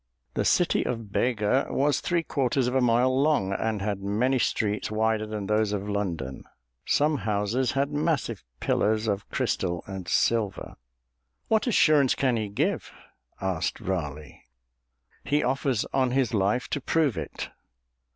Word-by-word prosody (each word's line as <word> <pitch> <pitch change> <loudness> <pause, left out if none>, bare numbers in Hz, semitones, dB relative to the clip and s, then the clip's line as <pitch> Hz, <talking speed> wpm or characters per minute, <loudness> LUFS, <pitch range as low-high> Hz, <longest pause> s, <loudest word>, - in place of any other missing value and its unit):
The - - -1
city - - +3
of 115 -4 -4
Bega 120 +2 +1
was 145 0 +1
three 170 -1 0
quarters 135 -3 0
of 125 - -1
a 130 - +3
mile 125 +2 +3
long 140 -11 +2
and 110 0 -1
had 100 -1 -2
many 115 +7 +1
streets 105 -2 0
wider 110 0 0
than 105 -2 -4
those 105 +1 +1
of 100 0 -3
London. 85 -11 -3 0.4
Some 150 +1 +2
houses 105 +5 0
had 140 +2 0
massive 145 - -1 0.2
pillars 110 +1 +1
of 100 -1 -2
crystal 85 -2 -1
and 95 -3 -7
silver." 105 +2 0 0.8
"What 220 +2 +2
assurance 155 - +4
can 130 -3 +1
he 110 -2 -1
give?" 100 - -1 0.5
asked 95 -4 -2
Raleigh. 75 -5 -5 0.8
"He 145 +1 +1
offers 130 -2 0
on 130 -2 +2
his 130 -1 +1
life 105 +4 +1
to 145 - -2
prove 150 -4 +1
it." 80 - -5
110 Hz, 145 wpm, -26 LUFS, 100-135 Hz, 0.8 s, assurance